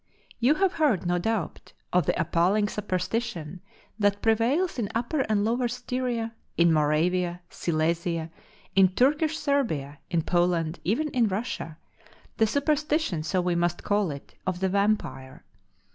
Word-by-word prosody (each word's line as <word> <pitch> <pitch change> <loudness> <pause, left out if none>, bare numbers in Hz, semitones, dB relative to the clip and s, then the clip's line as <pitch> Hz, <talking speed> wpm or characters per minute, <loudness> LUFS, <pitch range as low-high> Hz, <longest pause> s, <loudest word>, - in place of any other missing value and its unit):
You 255 +6 +4
have 380 +2 +2
heard, 265 - +1
no 175 0 +1
doubt, 220 -2 -3 0.2
of 180 0 +3
the - - +1
appalling 175 +5 +2
superstition 185 -4 -3 0.4
that 205 -1 +2
prevails 245 +10 +2
in 205 -4 -1
Upper 240 +6 -1
and 210 -1 +2
Lower 240 +2 +1
Styria, 245 -1 -3 0.2
in 170 -1 +5
Moravia, 170 +4 +1
Silesia, 165 0 -1 0.4
in 195 -1 +7
Turkish 300 +4 +2
Serbia, 160 - -1
in 170 -3 +1
Poland, 175 -2 +1
even 275 - 0
in 245 -5 +2
Russia; 190 -6 -4 0.6
the 220 - +4
superstition, 295 - 0
so 180 +4 0
we 180 0 0
must 175 0 0
call 205 -3 +1
it, 140 -1 -8
of 185 -1 -1
the 190 0 +1
Vampire. 200 -10 -1
200 Hz, 140 wpm, -26 LUFS, 170-240 Hz, 0.6 s, in